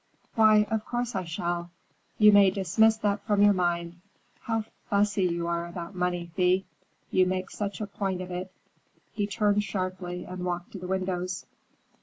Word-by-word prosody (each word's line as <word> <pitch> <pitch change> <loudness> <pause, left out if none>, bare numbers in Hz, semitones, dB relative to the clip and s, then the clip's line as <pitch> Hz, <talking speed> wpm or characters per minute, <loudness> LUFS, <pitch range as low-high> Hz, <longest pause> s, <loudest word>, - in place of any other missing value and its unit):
"Why, 215 -2 +5
of 220 -1 0
course 240 +1 -3
I 190 -3 -2
shall. 170 +1 -3 0.5
You 210 -1 +7
may 200 -1 +7
dismiss 200 +4 +3
that 205 -2 0
from 205 -2 +3
your 205 0 +7
mind. 175 -1 -1 0.4
How 225 -2 -2 0.3
fussy 205 -2 +2
you 170 -1 -1
are 170 0 -1
about 170 +1 -7
money, 175 -1 -2
Thea. 185 0 +3 0.5
You 185 -1 +4
make 185 0 -2
such 205 -1 -4
a 215 - -2
point 195 -2 -3
of 185 0 -6
it." 180 +1 -5 0.6
He 205 -1 -1
turned 210 0 +1
sharply 185 -2 -4
and 185 0 -6
walked 175 0 -3
to 195 - -7
the 180 - -6
windows. 185 -1 -2
185 Hz, 170 wpm, -27 LUFS, 180-205 Hz, 0.6 s, You